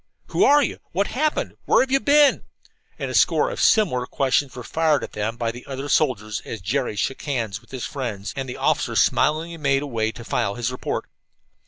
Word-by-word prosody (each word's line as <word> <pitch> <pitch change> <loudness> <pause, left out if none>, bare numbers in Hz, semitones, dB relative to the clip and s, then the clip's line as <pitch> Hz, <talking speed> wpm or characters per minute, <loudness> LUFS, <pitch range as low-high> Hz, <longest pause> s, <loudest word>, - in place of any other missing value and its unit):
"Who - - +2
are 290 +1 +6
you?" - - -3
"What 195 +4 +1
happened?" 300 +7 -1
"Where - - +4
have 260 - -6
you 270 - +4
been?" 290 0 +4 0.5
and - - -4
a - - -6
score - - +3
of - - -4
similar 165 - +3
questions 135 0 0
were 125 - -7
fired 160 +2 +1
at - - -6
them 110 +2 -3
by 115 -1 -1
the 120 +2 -11
other 135 +1 -5
soldiers 110 -9 +1
as 115 - -6
Jerry 115 +5 -1
shook 135 +6 -2
hands 115 -8 -3
with - - -24
his 130 -2 -5
friends, 115 -8 -5
and 135 -1 -4
the 125 - -6
officer - - 0
smilingly 160 +3 +2
made 140 -2 +1
away 115 -6 -1
to 115 - -10
file 110 -5 -1
his 120 0 -2
report. 125 - -3
135 Hz, 205 wpm, -23 LUFS, 115-160 Hz, 0.5 s, are